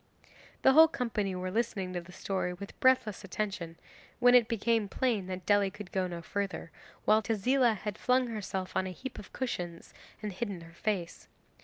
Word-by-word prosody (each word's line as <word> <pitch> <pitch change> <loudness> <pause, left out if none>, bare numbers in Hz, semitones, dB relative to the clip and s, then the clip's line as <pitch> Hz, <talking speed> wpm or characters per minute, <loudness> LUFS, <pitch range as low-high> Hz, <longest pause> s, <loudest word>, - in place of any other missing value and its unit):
The - - +7
whole 320 +3 +9
company 215 - -2
were 185 0 -3
listening 205 -4 -1
to 175 - -2
the 175 +1 -14
story 185 0 -2
with 200 +2 -10
breathless 255 -6 +3
attention, 180 -4 -4 0.4
when 245 0 +6
it 245 -3 +7
became 225 -2 +1
plain 225 -7 0
that 185 -1 -5
Dely 205 -1 +4
could 190 -1 -10
go 185 -1 0
no 170 -1 -6
further, 200 -4 -3 0.3
while 215 +1 +5
Tezila 230 +3 +2
had 210 -3 -5
flung 255 0 +3
herself 200 -5 -4
on 185 - +1
a - - -4
heap 265 -1 -7
of 200 - -11
cushions 175 -10 -4 0.3
and 210 -2 -3
hidden 195 -3 -4
her 165 0 -13
face. 180 -2 -3
205 Hz, 180 wpm, -31 LUFS, 185-235 Hz, 0.4 s, whole